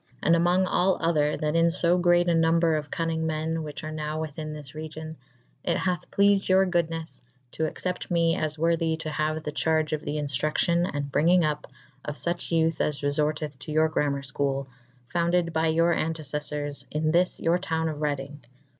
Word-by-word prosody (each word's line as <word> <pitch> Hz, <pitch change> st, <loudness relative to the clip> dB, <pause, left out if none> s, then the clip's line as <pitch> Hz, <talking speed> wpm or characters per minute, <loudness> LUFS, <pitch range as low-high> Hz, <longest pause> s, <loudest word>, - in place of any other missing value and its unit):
And 165 Hz, -, +5 dB
among 175 Hz, +2 st, +3 dB
all 185 Hz, +1 st, +2 dB
other 150 Hz, -3 st, +1 dB
that 150 Hz, +1 st, -1 dB
in 165 Hz, 0 st, +4 dB
lb 175 Hz, +1 st, +2 dB
greate 175 Hz, 0 st, +4 dB
a 170 Hz, -, +3 dB
nombre 165 Hz, 0 st, +3 dB
of 150 Hz, 0 st, -9 dB
cunnynge 165 Hz, -1 st, -1 dB
men 160 Hz, 0 st, -1 dB
whiche 150 Hz, -2 st, -6 dB
ar 155 Hz, -, -5 dB
nowe 155 Hz, 0 st, -3 dB
within 155 Hz, 0 st, -5 dB
this 150 Hz, -3 st, -9 dB
region 155 Hz, 0 st, -7 dB, 0.5 s
/it -, -, +1 dB
hathe 180 Hz, -3 st, -2 dB
pleafid 200 Hz, -1 st, +3 dB
your 190 Hz, +1 st, +5 dB
goodnes 165 Hz, -2 st, -2 dB, 0.3 s
to 160 Hz, -, -1 dB
accept 180 Hz, +3 st, -4 dB
me 165 Hz, -1 st, +2 dB
as 155 Hz, 0 st, -2 dB
worthy 165 Hz, 0 st, +1 dB
to° 160 Hz, -1 st, -5 dB
haue 155 Hz, +2 st, -1 dB
the 155 Hz, -1 st, -5 dB
charge 155 Hz, 0 st, +1 dB
of 155 Hz, -, -1 dB
the 150 Hz, -, -4 dB
inftruccyon^ 155 Hz, +5 st, +1 dB
and 145 Hz, -1 st, -4 dB
bryngyng 175 Hz, +5 st, +4 dB
uppe'' 150 Hz, -1 st, -2 dB, 0.3 s
of 150 Hz, -, -4 dB
fuche 170 Hz, +2 st, -2 dB
youthe 165 Hz, -1 st, +2 dB
as^ 150 Hz, -1 st, -1 dB
reforteth 150 Hz, 0 st, -1 dB
to 145 Hz, -, -8 dB
your 155 Hz, +1 st, +3 dB
gramer 145 Hz, -3 st, 0 dB
i'chole, 135 Hz, 0 st, -1 dB, 0.4 s
founded 170 Hz, +1 st, +1 dB
by 160 Hz, 0 st, +1 dB
your 165 Hz, +2 st, +3 dB
antecelTours 150 Hz, -2 st, -3 dB
in 155 Hz, +1 st, 0 dB
thys 180 Hz, +2 st, +2 dB
your 170 Hz, +2 st, +2 dB
towne 160 Hz, -3 st, -1 dB
of 155 Hz, -2 st, -3 dB
Redyng. 145 Hz, -1 st, -3 dB
160 Hz, 185 wpm, -26 LUFS, 150-170 Hz, 0.5 s, And